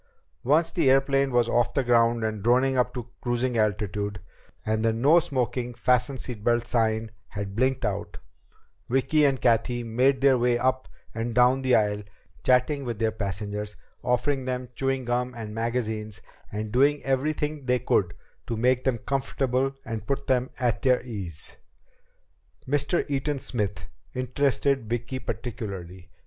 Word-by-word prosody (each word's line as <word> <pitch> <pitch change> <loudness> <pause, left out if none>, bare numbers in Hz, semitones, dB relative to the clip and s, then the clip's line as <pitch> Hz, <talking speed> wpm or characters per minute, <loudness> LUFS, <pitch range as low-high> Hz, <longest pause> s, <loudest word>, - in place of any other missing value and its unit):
Once 160 +6 +3
the 135 - +2
airplane 135 +1 +3
was 120 -1 +3
off 120 0 +1
the 135 - +2
ground 115 -1 +3
and 110 -2 -2
droning 130 +4 +3
up 125 -1 +2
to 125 -2 -6
cruising 120 0 0
altitude, 105 -2 -1 0.5
and 110 0 0
the 115 - +3
NO 140 +10 +5
SMOKING 125 -4 -2
FASTEN 125 +3 +2
SEAT 120 -5 -6
BELTS 120 +1 +1
sign 110 -1 +1 0.2
had 100 -1 -6
blinked 130 +3 +1
out, 105 0 -3 0.7
Vicki 135 +4 +3
and 135 -2 +2
Cathy 120 +1 +2
made 130 +4 +2
their 135 -2 +5
way 120 0 +2
up 130 +1 0 0.2
and 115 +1 -3
down 125 +2 +4
the 130 -1 +3
aisle, 105 -1 +1 0.4
chatting 130 +3 +2
with 120 -4 -4
their 110 0 +1
passengers, 105 0 -4 0.3
offering 125 +2 0
them 125 -1 -3
chewing 135 0 -1
gum 125 +1 -1
and 110 -2 -6
magazines, 110 -2 -2 0.3
and 105 0 -4
doing 140 +5 +3
everything 145 +1 -1
they 125 0 +3
could 100 -7 +1 0.3
to 115 - -2
make 125 +2 +2
them 130 -3 +2
comfortable 135 0 -1
and 110 -2 -5
put 140 0 -1
them 130 -1 +1
at 120 -3 0
their 130 -3 +3
ease. 95 - -7 1.1
Mr. 145 +5 +1
Eaton 145 0 -1
Smith 105 -7 -3 0.3
interested 135 -1 0
Vicki 120 +2 -3
particularly. 95 -9 -6
125 Hz, 150 wpm, -26 LUFS, 110-130 Hz, 1.1 s, NO